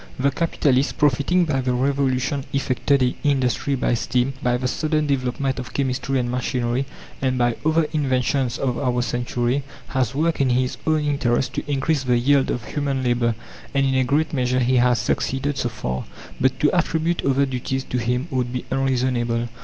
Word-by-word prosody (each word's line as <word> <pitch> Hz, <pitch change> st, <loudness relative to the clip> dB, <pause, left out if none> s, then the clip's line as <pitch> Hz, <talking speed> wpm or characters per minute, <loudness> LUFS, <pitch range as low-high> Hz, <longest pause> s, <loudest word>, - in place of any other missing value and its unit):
The 140 Hz, +2 st, +2 dB
capitalist, 140 Hz, -3 st, +1 dB
profiting 150 Hz, +5 st, +3 dB
by 135 Hz, -4 st, 0 dB
the 125 Hz, -1 st, 0 dB
revolution 135 Hz, +1 st, 0 dB
effected 140 Hz, 0 st, +1 dB
in 125 Hz, -, +2 dB
industry 140 Hz, -1 st, +1 dB
by 130 Hz, -, 0 dB
steam, 125 Hz, +3 st, 0 dB
by 125 Hz, -2 st, +1 dB
the 125 Hz, +1 st, -2 dB
sudden 155 Hz, +3 st, 0 dB
development 135 Hz, 0 st, -1 dB
of 125 Hz, 0 st, -7 dB
chemistry 135 Hz, 0 st, 0 dB
and 120 Hz, -1 st, -1 dB
machinery, 125 Hz, +1 st, -1 dB, 0.3 s
and 130 Hz, -1 st, +1 dB
by 120 Hz, -1 st, +2 dB
other 160 Hz, +1 st, +3 dB
inventions 130 Hz, -3 st, 0 dB
of 125 Hz, -3 st, -1 dB
our 125 Hz, -3 st, 0 dB
century, 120 Hz, +2 st, -1 dB, 0.3 s
has 130 Hz, -1 st, 0 dB
worked 160 Hz, +1 st, +1 dB
in 135 Hz, -, +3 dB
his 125 Hz, +1 st, +1 dB
own 155 Hz, -1 st, +3 dB
interest 130 Hz, -4 st, 0 dB
to 145 Hz, -, -4 dB
increase 145 Hz, +1 st, +1 dB
the 125 Hz, -2 st, +2 dB
yield 135 Hz, +3 st, +3 dB
of 120 Hz, -, -2 dB
human 140 Hz, -3 st, -1 dB
labour, 120 Hz, -2 st, +1 dB, 0.4 s
and 140 Hz, 0 st, +3 dB
in 135 Hz, -, +1 dB
a 130 Hz, 0 st, +3 dB
great 150 Hz, +5 st, +1 dB
measure 125 Hz, -2 st, +1 dB
he 125 Hz, +1 st, +3 dB
has 125 Hz, 0 st, +4 dB
succeeded 135 Hz, +5 st, -1 dB
so 120 Hz, -, 0 dB
far. 65 Hz, -, -4 dB, 0.3 s
But 130 Hz, 0 st, +1 dB
to 150 Hz, -, +4 dB
attribute 165 Hz, 0 st, 0 dB
other 140 Hz, +1 st, +2 dB
duties 130 Hz, 0 st, -3 dB
to 125 Hz, -, -2 dB
him 125 Hz, +5 st, -1 dB
would 125 Hz, -2 st, -1 dB
be 125 Hz, 0 st, -4 dB
unreasonable. 125 Hz, -3 st, 0 dB
130 Hz, 180 wpm, -22 LUFS, 125-140 Hz, 0.4 s, has